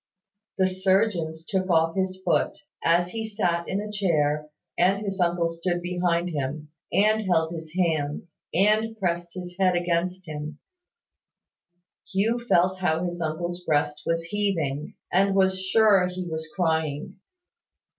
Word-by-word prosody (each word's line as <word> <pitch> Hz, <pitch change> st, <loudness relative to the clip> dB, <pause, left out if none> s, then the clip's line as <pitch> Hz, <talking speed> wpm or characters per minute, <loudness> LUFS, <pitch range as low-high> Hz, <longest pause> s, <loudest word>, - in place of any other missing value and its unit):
The 190 Hz, -1 st, +4 dB
surgeons 185 Hz, -4 st, +1 dB
took 190 Hz, -1 st, -1 dB
off 165 Hz, -1 st, +3 dB
his 190 Hz, -1 st, -1 dB
foot. -, -, +1 dB, 0.3 s
As 175 Hz, +1 st, +3 dB
he 225 Hz, -1 st, -3 dB
sat 180 Hz, -6 st, -1 dB
in 195 Hz, -, 0 dB
a 210 Hz, 0 st, -5 dB
chair, 150 Hz, -7 st, +1 dB, 0.3 s
and 190 Hz, +3 st, +3 dB
his 200 Hz, -2 st, -4 dB
uncle 170 Hz, -1 st, +2 dB
stood 170 Hz, +1 st, -2 dB
behind 175 Hz, -1 st, 0 dB
him, 150 Hz, +1 st, -3 dB, 0.2 s
and 215 Hz, +2 st, +3 dB
held 160 Hz, -1 st, +2 dB
his 160 Hz, -2 st, -7 dB
hands, 160 Hz, -2 st, -1 dB, 0.2 s
and 215 Hz, +4 st, +2 dB
pressed 175 Hz, -3 st, -2 dB
his 180 Hz, -1 st, -7 dB
head 185 Hz, -2 st, +4 dB
against 175 Hz, +1 st, -1 dB
him, 150 Hz, 0 st, -6 dB, 1.5 s
Hugh 220 Hz, +5 st, +1 dB
felt 185 Hz, -5 st, +2 dB
how 170 Hz, -2 st, +1 dB
his 175 Hz, -1 st, -3 dB
uncle's 175 Hz, +3 st, -3 dB
breast 150 Hz, -2 st, 0 dB
was 165 Hz, 0 st, +1 dB
heaving, 165 Hz, -7 st, -2 dB, 0.2 s
and 195 Hz, +2 st, +3 dB
was 190 Hz, -1 st, +3 dB
sure 195 Hz, -2 st, +4 dB
he 180 Hz, 0 st, -5 dB
was 160 Hz, -1 st, -4 dB
crying. 160 Hz, -4 st, -1 dB
175 Hz, 140 wpm, -26 LUFS, 160-190 Hz, 1.5 s, The